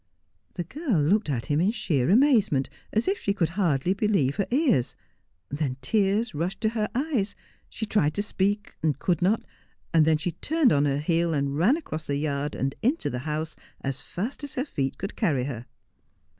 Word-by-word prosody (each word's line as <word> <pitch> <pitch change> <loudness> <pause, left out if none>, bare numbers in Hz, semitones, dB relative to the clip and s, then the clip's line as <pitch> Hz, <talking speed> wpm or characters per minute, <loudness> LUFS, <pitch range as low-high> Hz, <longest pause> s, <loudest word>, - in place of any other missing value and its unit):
The 175 - -2
girl 255 - -1
looked 175 +5 +2
at 120 -5 -1
him 150 0 +1
in 185 - +3
sheer 175 - 0
amazement, 215 - +4 0.2
as 220 +8 0
if 390 +1 +1
she 200 - -1
could 170 -5 +1
hardly 170 -3 +1
believe 195 -10 +1
her 200 - 0
ears, 250 - +2 0.5
then 140 -2 -2
tears 205 - +1
rushed 175 +6 -2
to 220 - +2
her 215 -2 -1
eyes: 255 -7 0 0.3
she 220 - -4
tried 155 -8 +1
to 205 - 0
speak, 205 0 -1
and 155 -3 +1
could 175 +2 0
not, 200 +5 +2 0.5
and 165 -1 +6
then 160 0 +4
she 165 +3 -2
turned 290 - +2
on 145 0 +3
her 140 -1 +1
heel 165 +2 +1
and 140 -1 0
ran 200 - +4
across 155 - -6
the 140 - -1
yard 145 0 -2
and 135 +1 -1
into 270 +8 +1
the 125 - -3
house 155 +1 -2 0.3
as 135 0 -3
fast 230 +11 -5
as 285 - -7
her 260 - -1
feet 135 - -2
could 195 +3 -5
carry 150 - +1
her. 125 -3 -5
175 Hz, 195 wpm, -26 LUFS, 145-215 Hz, 0.5 s, and